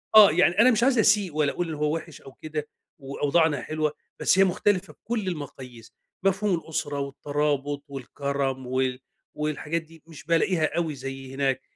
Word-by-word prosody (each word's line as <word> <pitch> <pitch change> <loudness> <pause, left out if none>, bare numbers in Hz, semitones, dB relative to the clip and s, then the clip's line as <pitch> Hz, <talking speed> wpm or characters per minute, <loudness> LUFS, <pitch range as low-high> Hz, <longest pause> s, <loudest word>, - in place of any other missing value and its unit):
آه، 210 -6 +10
يعني 175 +3 +3
أنا 255 +2 +7
مش 230 +1 +2
عايز 255 -3 +4
أسيء 205 -6 +3
ولا 150 -2 +2
اقول 175 -1 -3
إن - - -3
هو 150 +1 0
وحش 165 -2 -8
أو 135 - -13
كده 155 -1 -5 0.3
وأوضاعنا 145 +1 +1
حلوة، 155 -1 -1 0.3
بس 190 - +3
هي - - +8
مختلفة 190 +1 0
بكل 220 -4 -4
المقاييس، 130 -8 -7 0.3
مفهوم 195 0 +2
الأسرة 150 -3 -3
والترابط 145 0 -2
والكرم 135 -1 -3
وال 130 0 0 0.4
والحاجات 150 +2 -2
دي 165 -1 -18
مش 160 -3 -12
بالاقيها 165 0 +2
أوي 160 -4 -1
زي 135 0 -7
هناك، 135 -1 0
150 Hz, 165 wpm, -26 LUFS, 140-175 Hz, 0.4 s, آه